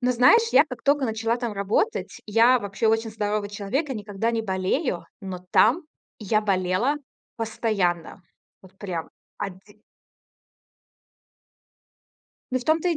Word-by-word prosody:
Но 250 0 +2
знаешь, 455 - +5
я - - +7
как 250 -3 -8
токо 285 -1 +3
начала 225 +1 0
там 240 -2 -3
работать, 205 - -1
я 230 +4 +5
вообще 200 +1 -2
очень 225 0 +2
здоровый 210 -1 -2
человек 210 +9 -2
и - - -2
никогда 210 +1 -2
не 225 -1 -1
болею, 190 - -1
но 185 -2 -7
там 245 - +4 0.4
я 215 0 +1
болела 195 +6 +1 0.4
постоянно, 205 -6 -1 0.4
вот 190 - -16
прям. 175 -5 -5 0.3
Оди 195 +2 -8 2.7
Ну 255 - +1
в 245 - -10
том-то 320 +4 +2
и 335 - 0
220 Hz, 135 wpm, -25 LUFS, 200-250 Hz, 2.7 s, я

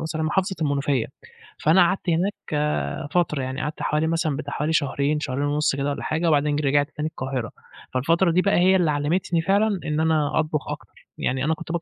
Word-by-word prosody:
محافظة 170 +5 0
المنوفية، 140 -4 0 0.5
فأنا 165 +4 +5
قعدت 185 +1 +1
هناك 175 +5 +1 0.2
آآ 150 0 -1
فترة 165 -5 +1
يعني، 130 +2 -4
قعدت 150 0 -4
حوالي 150 +1 +1
مثلًا 160 -3 0
بتاع 145 -1 -5
حوالي 150 +2 -1
شهرين، 145 0 +1
شهرين 140 -2 -2
ونُص 145 0 +1
كده 140 +1 -1
والّا 140 - -4
حاجة، 160 +2 -1
وبعدين 150 -1 +2
ج 150 - 0
رجعت 145 +1 +2
تاني 150 +1 -2
القاهرة، 130 -5 -4 0.4
فالفترة 165 +7 +2
دي 180 - +3
بَقى 200 +2 +2
هي 185 +2 +5
اللي 175 -5 +3
علّمتني 165 +4 0
فعلًا 200 +3 +2
إن 150 0 -1
أنا 160 -2 +1
أطبخ 155 -1 -1
أكتر، 145 -7 -9
يعني 130 0 -1
أنا 160 +3 +2
كنت - - -8
150 Hz, 195 wpm, -24 LUFS, 145-165 Hz, 0.5 s, فأنا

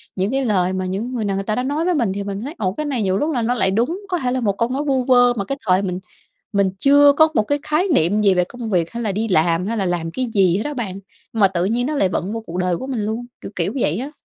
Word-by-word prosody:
những 195 +4 -1
cái 270 -1 0
lời 185 -4 +1
mà 185 0 -2
những 205 +7 -3
người 230 -4 -2
nào 195 -1 -1
người 195 - -2
ta 215 - -1
đã 250 - -1
nói 290 +5 -1
với 360 - +2
mình 230 -9 +1
thì 200 0 -4
mình 200 0 -5
thấy, 285 +7 -6
ồ, 190 -4 -1
cái 305 +6 -4
này 265 -6 -1
nhiều 190 0 +1
lúc 310 +6 0
là 245 - 0
nó 235 +2 +1
lại 190 -5 +1
đúng. 255 - 0
Có 355 - 0
thể 250 -4 -1
là 260 - 0
một 200 -4 -1
câu 230 - 0
nói 270 +3 -2
vu 265 -3 +1
vơ 245 -1 +5
mà 200 -4 -3
cái 275 - -3
thời 185 +1 +4
mình 180 -2 -3 0.5
mình 200 -2 +2
chưa 285 +2 +6
có 315 +2 +5
một 215 - +3
cái 290 +7 0
khái 310 +6 0
niệm 205 - +2
gì 195 -2 +4
về 180 - +2
công 235 +3 -7
việc 170 -3 +1
hay 235 0 -5
là 210 -3 -1
đi 220 +3 -2
làm 170 0 +2
hay 230 +2 -2
là 195 -3 0
làm 170 -2 -2
cái 255 +7 -2
gì 185 -3 +4
hết 210 - -1
á 295 0 -3
bạn, 195 -6 -4 0.3
nhưng 225 - -3
mà 195 - +6
tự 180 -1 -1
nhiên 240 +5 0
nó 305 - -2
lại 195 - +2
vận 185 +3 -3
vô 225 - -3
cuộc 170 - -6
đời 180 -1 0
của 260 - -6
mình 255 -5 -3
luôn, 225 +3 -3 0.2
kiểu, - - -8
kiểu, 180 +3 -1
vậy 160 -3 +1
á. 275 +4 -5
215 Hz, 325 wpm, -20 LUFS, 190-255 Hz, 0.5 s, chưa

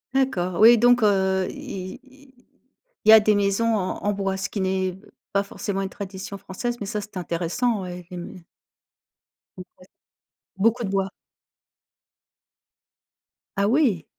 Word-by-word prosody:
D'accord, 185 -10 0
oui 230 +2 +8
donc, 245 0 +5
heu, 190 -2 +2
i 185 -1 -7
i 265 0 -20 0.7
il - - +4
y - - +11
a 220 - +10
des 210 0 +3
maisons 205 +3 +1
en 185 -2 -3
en 205 - +1
bois, 195 -1 -2
ce 190 - -3
qui 205 - -4
n'est 190 -1 -1 0.3
pas 200 0 +2
forcément 200 0 -4
une 195 - -3
tradition 200 0 -7
française, 240 +7 -4
mais - - -2
ça 210 +1 -2
c'est 205 -1 -9
intéressant 180 +6 -1
oui 180 -1 -7
et 180 - -7
mais 175 +1 -9 1.1
Ouais, 185 - -7 0.9
beaucoup 230 +4 +2
de - - -2
bois. 195 0 0 2.5
Ah 200 - +2
oui! 235 - +2
200 Hz, 150 wpm, -24 LUFS, 190-225 Hz, 2.5 s, y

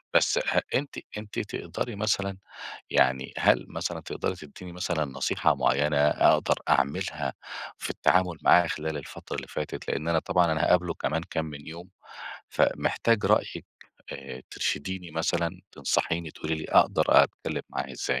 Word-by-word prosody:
بس - - +4
أ - - +1
أنتِ 140 +1 -1 0.2
أنتِ 105 -1 -5
تقدري 120 - -4
مثلًا، 100 -2 0 0.5
يعني 65 +1 +2
هل - - +3
مثلًا - - -4
تقدري - - -3
تدّيني 85 +3 -11
مثلًا 85 -3 -1
نصيحة 65 -1 +1
معيّنة 75 +2 +2
أقدر 75 +1 +4
أعملها 70 - +1 0.5
في - - -4
التعامل 90 -3 +2
معاه 90 0 +6
خلال 80 -1 -3
الفترة 70 - -7
اللي - - -5
فاتت؟ 75 - -5
لإن 80 - -2
أنا 85 -1 +3
طبعًا 90 0 +2
أنا 80 - 0
هاقابله 90 -1 +3
كمان 80 +1 -1
كام 80 - -1
من 75 -2 -9
يوم، 85 +3 -9 0.6
فمحتاج 115 -2 +1
رأيِِك، - - +1 0.5
آآ، 65 - -8
ترشديني 90 +2 -3
مثلًا، 80 +1 0 0.2
تنصحيني 80 -1 -1
تقولي 80 +1 -3
لي 80 - -5
أقدر - - +5
أتكلم - - +3
معاه 65 0 -4
إزاي؟ - - -1
80 Hz, 145 wpm, -27 LUFS, 75-90 Hz, 0.6 s, معاه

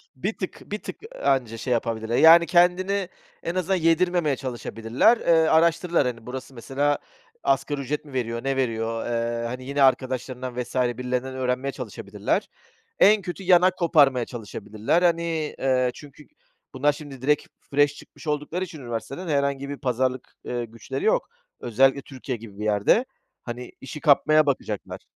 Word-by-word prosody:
Bir 195 +12 -3
tık, 185 - -6
bir 210 - -2
tık, - - -7 0.2
ııı, - - -8
anca 125 -4 +1
şey 125 +2 -1
yapabilirler. 115 0 -1
Yani, 170 +1 +8
kendini 185 +2 +2 0.3
en 170 - -3
azından 185 +1 +1
yedirmemeye 165 -2 +2
çalışabilirler. 120 - +1
Eee, - - -10 0.2
araştırırlar. 170 0 +3
Hani, 115 -2 -5
burası, 130 +1 -7
mesela, 140 +4 0 0.5
asgari 140 +1 0
ücret 150 +3 -3
mi 145 - -13
veriyor, 115 -2 -2
ne 135 0 0
veriyor? 115 -3 -1
Eee, 115 0 -1
hani, 125 +2 -6
yine 140 +1 +1
arkadaşlarından 130 -1 0
vs. 120 - -8
birilerinden 125 +1 -1
öğrenmeye 130 +1 -1
çalışabilirler. 125 -7 -3 0.5
En 210 +1 +6
kötü 180 +1 -6
yan 180 -1 +6
hak 185 0 +3
koparmaya 140 -8 +4
çalışabilirler. 110 - -2
Hani, 165 -3 0
eee, 130 -2 +2
çünkü 145 0 -13 0.5
bunlar 145 +3 +2
şimdi 145 -3 -10
direkt 150 +3 +1 0.2
fresh 145 0 +3
çıkmış 155 - -14
oldukları 150 +5 -2
için 165 -4 -8
üniversiteden 120 +8 -5
herhangi 140 -1 0
bir 145 - -5
pazarlık, 130 -1 -1
eee, 120 -1 -3
güçleri 115 - -6
yok. - - +2 0.3
Özellikle 135 +4 +3
Türkiye 130 -2 -6
gibi 105 -3 -12
bir 105 - -4
yerde. 105 - +3 0.4
Hani, 120 +1 -7
işi 135 +3 -7
kapmaya 155 +1 +4
bakacaklar. 120 -7 -3
135 Hz, 155 wpm, -24 LUFS, 120-160 Hz, 0.5 s, Yani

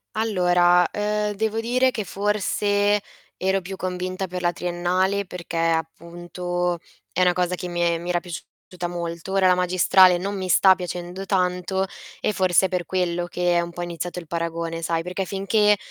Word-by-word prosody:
Allora, 180 -5 +3
uhm, 210 0 -1
devo 220 +2 -1
dire 250 +3 +2
che 215 -4 -3
forse 205 +1 +1 0.4
ero 190 +1 +1
più 190 +2 -7
convinta 185 0 -3
per 180 0 -5
la 175 -1 +2
triennale 180 +3 0
perché, 175 -2 -6
appunto, 170 +2 -2 0.3
è 185 - +2
'na 180 -1 +4
cosa 180 0 0
che 180 - -6
mi 175 0 -1
e 170 -1 +1
mi 175 +1 -6
era 175 -1 +2
piaciuta 175 +1 -8
molto. 170 +1 -5
Ora 195 -1 +3
la 180 - +5
magistrale 180 0 +5
non 200 +3 -3
mi 185 -1 -4
sta 190 +1 +6
piacendo 180 +1 -6
tanto, 185 0 0 0.4
e 210 - 0
forse 185 -1 +3
è - - -1
per 180 -1 -2
quello 175 -2 -1
che 175 0 0
è - - +3
un 170 0 -5
po' 175 +1 -5
iniziato 175 +1 -5
il 170 - -10
paragone, 165 0 -3
sai, 165 0 -1
perché 180 +2 -3
finché 210 +2 +2
180 Hz, 175 wpm, -23 LUFS, 175-195 Hz, 0.4 s, sta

